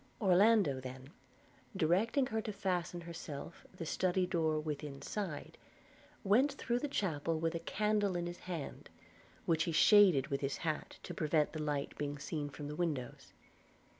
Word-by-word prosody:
Orlando 195 Hz, -, +4 dB
then, 130 Hz, +2 st, -8 dB, 0.7 s
directing 200 Hz, -, +3 dB
her 220 Hz, -3 st, -2 dB
to 215 Hz, -, -4 dB
fasten 180 Hz, -3 st, -2 dB
herself 165 Hz, -2 st, -8 dB
the 185 Hz, -3 st, -7 dB
study 185 Hz, +3 st, +1 dB
door 160 Hz, -3 st, +1 dB
within 150 Hz, -2 st, -5 dB
side, 185 Hz, -9 st, -5 dB, 0.6 s
went 255 Hz, +9 st, +4 dB
through 245 Hz, -3 st, -1 dB
the 295 Hz, -, -2 dB
chapel 165 Hz, -, -1 dB
with 165 Hz, +1 st, 0 dB
a 170 Hz, -, -2 dB
candle 210 Hz, +2 st, 0 dB
in 175 Hz, 0 st, -1 dB
his 175 Hz, 0 st, -6 dB
hand, 170 Hz, -5 st, -6 dB, 0.6 s
which 165 Hz, -1 st, +2 dB
he 170 Hz, -, -1 dB
shaded 180 Hz, -4 st, +6 dB
with 140 Hz, -, -1 dB
his 140 Hz, 0 st, -1 dB
hat 155 Hz, -2 st, -2 dB
to -, -, -6 dB
prevent 155 Hz, -1 st, +1 dB
the 155 Hz, -, -3 dB
light 145 Hz, -2 st, -2 dB
being 145 Hz, 0 st, -2 dB
seen 145 Hz, +1 st, -4 dB
from 145 Hz, +1 st, -7 dB
the 150 Hz, -, -5 dB
windows. 150 Hz, -8 st, -3 dB
170 Hz, 160 wpm, -35 LUFS, 150-195 Hz, 0.7 s, shaded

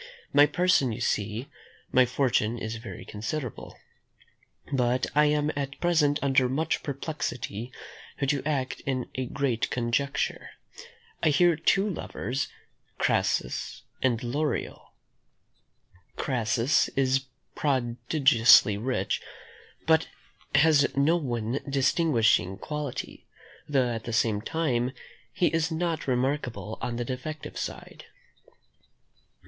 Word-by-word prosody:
My 145 Hz, +1 st, +7 dB
person 175 Hz, -6 st, +2 dB
you 110 Hz, -, -5 dB
see; 110 Hz, +2 st, -1 dB, 0.4 s
my 130 Hz, -1 st, +5 dB
fortune 120 Hz, -3 st, +1 dB
is 110 Hz, 0 st, -4 dB
very 115 Hz, 0 st, -9 dB
considerable; 115 Hz, +4 st, -5 dB, 1.0 s
but 125 Hz, -1 st, +2 dB
I 150 Hz, +1 st, +5 dB
am 150 Hz, 0 st, +2 dB
at 140 Hz, -1 st, -4 dB
present 155 Hz, -4 st, +3 dB
under 135 Hz, -2 st, +3 dB
much 155 Hz, +5 st, 0 dB
perplexity 130 Hz, -6 st, -4 dB, 0.5 s
how 140 Hz, -, -1 dB
to 140 Hz, 0 st, +1 dB
act 135 Hz, -4 st, -2 dB
in 130 Hz, -2 st, -2 dB
a 130 Hz, -1 st, -3 dB
great 135 Hz, -4 st, -1 dB
conjuncture. 125 Hz, +3 st, -1 dB, 0.7 s
I -, -, +4 dB
have 160 Hz, +2 st, +3 dB
two 195 Hz, +2 st, +4 dB
lovers, 135 Hz, -, -3 dB, 0.5 s
Crassus -, -, 0 dB, 0.2 s
and 120 Hz, -3 st, +1 dB
Lorio; 145 Hz, +3 st, -2 dB, 1.3 s
Crassus 120 Hz, 0 st, +1 dB
is 135 Hz, 0 st, +2 dB, 0.3 s
prodigiously 125 Hz, -4 st, +4 dB
rich, 125 Hz, +3 st, -1 dB, 0.6 s
but 160 Hz, 0 st, +3 dB, 0.5 s
has 145 Hz, -1 st, +4 dB
no 145 Hz, +5 st, +4 dB
one 120 Hz, -5 st, -2 dB
distinguishing 125 Hz, -, +2 dB
quality; 150 Hz, -3 st, -5 dB, 0.4 s
though 130 Hz, -4 st, +2 dB
at 115 Hz, -1 st, -4 dB
the 115 Hz, -, -4 dB
same 110 Hz, -1 st, +1 dB
time 130 Hz, -4 st, -1 dB, 0.4 s
he 180 Hz, -, +1 dB
is 165 Hz, 0 st, +1 dB
not 165 Hz, -1 st, -2 dB
remarkable 125 Hz, -3 st, -1 dB
on 120 Hz, -, -2 dB
the 120 Hz, 0 st, -3 dB
defective 135 Hz, +5 st, -6 dB
side. -, -, -7 dB
135 Hz, 110 wpm, -27 LUFS, 120-150 Hz, 1.3 s, My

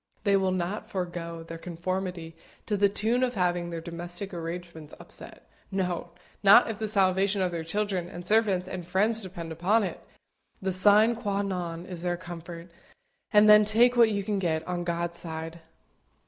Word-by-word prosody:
They 200 Hz, -2 st, +3 dB
will 190 Hz, -1 st, +2 dB
not 185 Hz, +3 st, -3 dB
forego 170 Hz, -3 st, -4 dB
their 165 Hz, 0 st, -8 dB
conformity 175 Hz, -1 st, -4 dB, 0.3 s
to 210 Hz, -, 0 dB
the 200 Hz, 0 st, +3 dB
tune 225 Hz, +5 st, 0 dB
of 250 Hz, -1 st, 0 dB
having 175 Hz, -2 st, 0 dB
their 170 Hz, -1 st, -4 dB
domestic 175 Hz, +3 st, -6 dB
arrangements 170 Hz, -2 st, -7 dB
upset -, -, -10 dB, 0.2 s
no, 180 Hz, -3 st, -2 dB, 0.3 s
not 205 Hz, +4 st, +7 dB
if 210 Hz, -, -8 dB
the 220 Hz, -, -2 dB
salvation 195 Hz, -1 st, +2 dB
of 180 Hz, -, 0 dB
their 170 Hz, -1 st, -4 dB
children, 190 Hz, 0 st, -2 dB
and 175 Hz, -2 st, -9 dB
servants, 200 Hz, -3 st, +2 dB
and 180 Hz, -2 st, -6 dB
friends 215 Hz, +5 st, +2 dB
depends 175 Hz, -4 st, -7 dB
upon 195 Hz, +7 st, +2 dB
it. 185 Hz, -, -5 dB, 0.6 s
The 190 Hz, -1 st, -2 dB
sine 210 Hz, +5 st, +5 dB
qua 205 Hz, -3 st, -2 dB
non 175 Hz, -3 st, -4 dB
is 180 Hz, -3 st, -8 dB
their 175 Hz, 0 st, 0 dB
own -, -, -4 dB
comfort, 170 Hz, -1 st, -9 dB, 0.6 s
and 210 Hz, 0 st, +6 dB
then 210 Hz, 0 st, +8 dB
take 235 Hz, +4 st, +4 dB
what 235 Hz, -2 st, +6 dB
you 200 Hz, -2 st, -1 dB
can 205 Hz, 0 st, -1 dB
get, 160 Hz, -3 st, -1 dB
on 180 Hz, -1 st, -2 dB
God's 170 Hz, 0 st, -3 dB
side. 165 Hz, 0 st, -6 dB
185 Hz, 175 wpm, -27 LUFS, 170-205 Hz, 0.6 s, then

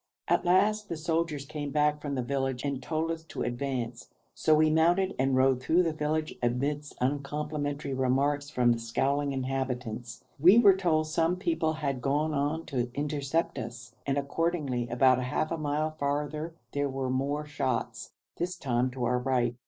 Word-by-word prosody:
At -, -, +2 dB
last 210 Hz, +4 st, +3 dB
the 170 Hz, -, -3 dB
soldiers 160 Hz, -3 st, -1 dB
came 150 Hz, 0 st, -5 dB
back 150 Hz, 0 st, +1 dB
from 145 Hz, -2 st, -3 dB
the 130 Hz, -, -1 dB
village 135 Hz, -1 st, -2 dB
and 140 Hz, -2 st, -2 dB
told 160 Hz, +4 st, -1 dB
us 165 Hz, -1 st, -5 dB
to -, -, -4 dB
advance, 120 Hz, -1 st, -3 dB, 0.2 s
so 155 Hz, -, +3 dB
we 155 Hz, 0 st, +4 dB
mounted 175 Hz, +4 st, +3 dB
and 135 Hz, 0 st, +2 dB
rode 130 Hz, -1 st, +3 dB
through 165 Hz, +7 st, +3 dB
the 165 Hz, -2 st, 0 dB
village 155 Hz, +1 st, -1 dB
amidst 140 Hz, +5 st, -1 dB
uncomplimentary 145 Hz, +1 st, -2 dB
remarks 140 Hz, +3 st, +1 dB
from 125 Hz, -4 st, +3 dB
the 115 Hz, -, +1 dB
scowling 140 Hz, +5 st, 0 dB
inhabitants. 130 Hz, -3 st, -3 dB, 0.2 s
We 180 Hz, +9 st, +7 dB
were 205 Hz, -5 st, +7 dB
told 165 Hz, -5 st, +1 dB
some 165 Hz, +2 st, +1 dB
people 185 Hz, -, 0 dB
had 140 Hz, -5 st, -2 dB
gone 150 Hz, +3 st, +1 dB
on 150 Hz, +3 st, -1 dB
to 125 Hz, -4 st, -2 dB
intercept 145 Hz, +2 st, -1 dB
us, 120 Hz, +1 st, -8 dB
and 140 Hz, 0 st, +1 dB
accordingly 140 Hz, -4 st, -1 dB
about 130 Hz, +1 st, +4 dB
half 145 Hz, +4 st, -1 dB
a 165 Hz, -, -1 dB
mile 155 Hz, +1 st, 0 dB
farther 150 Hz, +2 st, -2 dB, 0.2 s
there 145 Hz, 0 st, 0 dB
were 130 Hz, -1 st, -2 dB
more 140 Hz, +3 st, -1 dB
shots, 145 Hz, -3 st, -3 dB, 0.2 s
this 180 Hz, +1 st, -2 dB
time 125 Hz, -5 st, 0 dB
to 125 Hz, -1 st, -4 dB
our 125 Hz, +1 st, +2 dB
right. 125 Hz, -2 st, +1 dB
145 Hz, 170 wpm, -29 LUFS, 130-155 Hz, 0.2 s, We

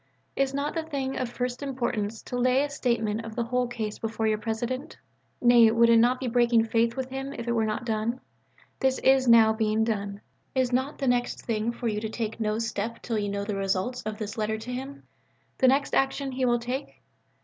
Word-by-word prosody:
Is 275 Hz, -1 st, +1 dB
not 280 Hz, +2 st, -2 dB
the 330 Hz, -, -1 dB
thing 275 Hz, -4 st, -3 dB
of 255 Hz, -, -2 dB
first 250 Hz, +1 st, -3 dB
importance 235 Hz, -6 st, -2 dB
to 250 Hz, -, -6 dB
lay 255 Hz, +2 st, +3 dB
a 290 Hz, -, -3 dB
statement 230 Hz, -5 st, -1 dB
of 225 Hz, -1 st, -8 dB
the 235 Hz, -, 0 dB
whole 250 Hz, +1 st, 0 dB
case 220 Hz, -3 st, -4 dB
before 225 Hz, 0 st, -2 dB
your 215 Hz, -1 st, +1 dB
President? 240 Hz, +7 st, -3 dB, 0.4 s
Nay, 240 Hz, -2 st, +6 dB
would 230 Hz, +1 st, +4 dB
it 230 Hz, -, +7 dB
not 245 Hz, +2 st, +4 dB
be 265 Hz, -, -4 dB
breaking 235 Hz, -1 st, +3 dB
faith 230 Hz, +2 st, +1 dB
with 260 Hz, -1 st, -3 dB
him 270 Hz, +1 st, -4 dB
if 235 Hz, -3 st, -7 dB
it -, -, +1 dB
were 225 Hz, -2 st, +1 dB
not 215 Hz, +2 st, -3 dB
done? 225 Hz, +2 st, -1 dB, 0.6 s
This 265 Hz, -1 st, +2 dB
is 265 Hz, -1 st, +3 dB
now 225 Hz, -2 st, +7 dB
being 220 Hz, 0 st, +1 dB
done. 200 Hz, -2 st, -2 dB, 0.3 s
Is 255 Hz, -1 st, +1 dB
not 260 Hz, +4 st, 0 dB
the 275 Hz, -, -2 dB
next 245 Hz, 0 st, 0 dB
thing 225 Hz, 0 st, 0 dB
for 235 Hz, 0 st, -4 dB
you 210 Hz, -1 st, -1 dB
to 220 Hz, -, -3 dB
take 220 Hz, 0 st, -4 dB
no 215 Hz, -1 st, 0 dB
step 230 Hz, 0 st, -3 dB
till 225 Hz, -3 st, -1 dB
you 205 Hz, -1 st, -2 dB
know 200 Hz, 0 st, -2 dB
the 205 Hz, 0 st, -3 dB
results 195 Hz, +5 st, -1 dB
of 215 Hz, 0 st, -5 dB
this 215 Hz, 0 st, -5 dB
letter 220 Hz, 0 st, 0 dB
to 230 Hz, +3 st, -6 dB
him 270 Hz, +3 st, -6 dB, 0.6 s
the 260 Hz, -, +5 dB
next 275 Hz, +2 st, +2 dB
action 270 Hz, 0 st, +1 dB
he 260 Hz, 0 st, -1 dB
will 240 Hz, -1 st, +3 dB
take? 250 Hz, +4 st, -5 dB
235 Hz, 220 wpm, -27 LUFS, 220-255 Hz, 0.6 s, it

